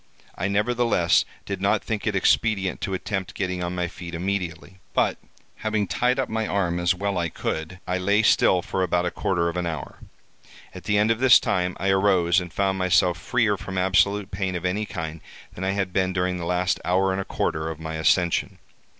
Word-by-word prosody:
I 90 - -2
nevertheless 105 -5 +2 0.2
did - - -4
not - - +2
think 110 -1 -3
it 105 - 0
expedient 100 -1 +1
to 95 - -2
attempt 95 0 -4
getting 90 -2 -2
on 90 +1 -3
my 90 -1 -1
feet 85 0 -8
immediately; 95 0 -4 0.2
but, - - +1 0.4
having 110 -1 -1
tied 125 +5 +1
up 135 - 0
my 110 -1 -2
arm 90 -3 0
as 85 +2 +2
well 100 0 -1
as 85 - 0
I - - -2
could, 80 +4 -4
I 90 +1 -1
lay 100 +4 +2
still 90 -4 +4
for 95 - -2
about 90 -1 +1
a 90 - -1
quarter 85 -3 0
of 85 +1 -3
an 90 -1 -1
hour. 80 -3 -6 0.7
At 90 -1 -10
the 105 -1 +2
end 105 +2 +3
of 115 - 0
this 130 -2 +7
time 90 0 -1
I 95 - 0
arose, 95 -2 +3
and 90 -2 -7
found 95 0 0
myself 90 -1 +3
freer 110 0 +1
from 95 0 -6
absolute 95 +2 +2
pain 95 -1 -2
of 90 0 -4
any 100 +4 -1
kind 80 -4 -5 0.3
than 90 - -7
I 95 0 0
had 95 -2 -2
been 95 -1 +1
during 90 0 0
the 85 - -5
last 90 +1 0
hour 95 +2 +2
and 95 +1 -1
a - - -3
quarter 80 -3 -2
of 80 -1 -6
my 80 0 -5
ascension. 85 +2 +1
95 Hz, 210 wpm, -24 LUFS, 90-100 Hz, 0.7 s, this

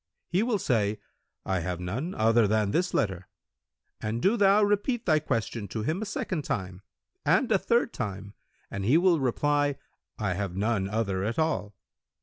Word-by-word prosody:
He 180 +3 +2
will 230 -1 +1
say, 110 - 0 0.5
'I 95 -1 0
have 90 0 -3
none 120 - -4
other 115 0 +4
than 105 -1 +1
this 180 - +1
letter'; 95 -3 -1 0.7
but 110 +2 -2
do 195 - +3
thou 205 -1 +5
repeat 205 +4 +1
thy 155 -3 +4
question 115 -6 -2
to 105 +3 -4
him 160 - -1
a - - -2
second 185 -6 -3
time 95 -5 -4 0.4
and 255 - +2
a 200 - +4
third 235 +3 +1
time, 100 0 -5 0.4
and 100 - -4
he 125 +10 +4
will 175 -2 +4
reply, 145 +2 +1 0.4
'I 100 -3 -1
have 95 -1 -3
none 100 -1 0
other 100 -3 -1
at 110 +3 -2
all.' 155 -11 -1
115 Hz, 170 wpm, -28 LUFS, -, 0.7 s, thou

